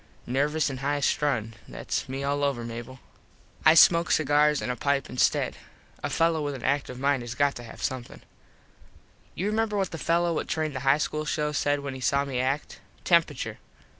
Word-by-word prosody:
Nervous 145 +4 0
an 130 - -5
high 145 +2 -1
strung. 125 -6 0
Thats - - -4
me 135 +1 -4
all 145 +1 0
over, 135 -4 0
Mable. 120 +2 -7 0.6
I 155 - +7
smoke 170 +1 +6
cigars 150 0 +3
an 125 - -2
a - - -3
pipe 140 +1 -1
instead. 125 - +1 0.4
A - - -2
fello 165 -1 +1
with 145 -1 -3
an 125 - -9
active 140 -3 -1
mind 140 -1 +1
has 120 0 -6
got 140 +1 +2
to 120 - -8
have 115 - -10
somethin. 130 -2 -4 1.1
You 185 - -3
remember 215 0 0
what 195 -2 -1
the 165 - -6
fello 170 +1 +1
what - - -2
trained 155 -3 -2
the - - -2
high 135 +2 +3
school 155 0 -2
show 150 0 -1
said 145 0 0
when 140 -1 -5
he 130 - -8
saw 140 +2 +1
me 130 -3 -3
act. 135 +3 -2 0.2
Temperature. 165 -5 +1
145 Hz, 195 wpm, -26 LUFS, 130-155 Hz, 1.1 s, I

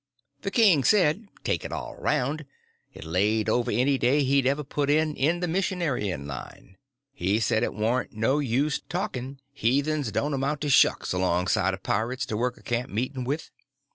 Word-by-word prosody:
The 195 - -2
king 195 - +4
said, 195 - +3 0.2
take - - -1
it - - -6
all - - -5
around, 145 +4 -1 0.5
it - - -11
laid 100 +7 +1
over 120 0 +1
any 130 +5 +2
day 140 +4 +3
he'd 135 -1 +2
ever 140 +2 +1
put 145 +1 -2
in 155 0 +2
in 165 +6 +1
the 180 - 0
missionarying 160 - -1
line. 70 +7 -9 0.4
He 100 0 0
said 110 0 +1
it - - -1
warn't 115 +4 0
no 115 +7 +1
use 140 +2 0
talking, 130 +2 -4
heathens 140 +1 0
don't 145 +7 -1
amount 140 +2 -1
to 150 - -1
shucks 135 - +4
alongside 90 +2 +1
of 95 - -19
pirates 120 +5 -1
to 110 - -4
work 125 +3 -1
a - - -18
camp 120 +1 -2
meeting 125 +4 -3
with. 145 +5 -3
130 Hz, 175 wpm, -26 LUFS, 110-150 Hz, 0.5 s, king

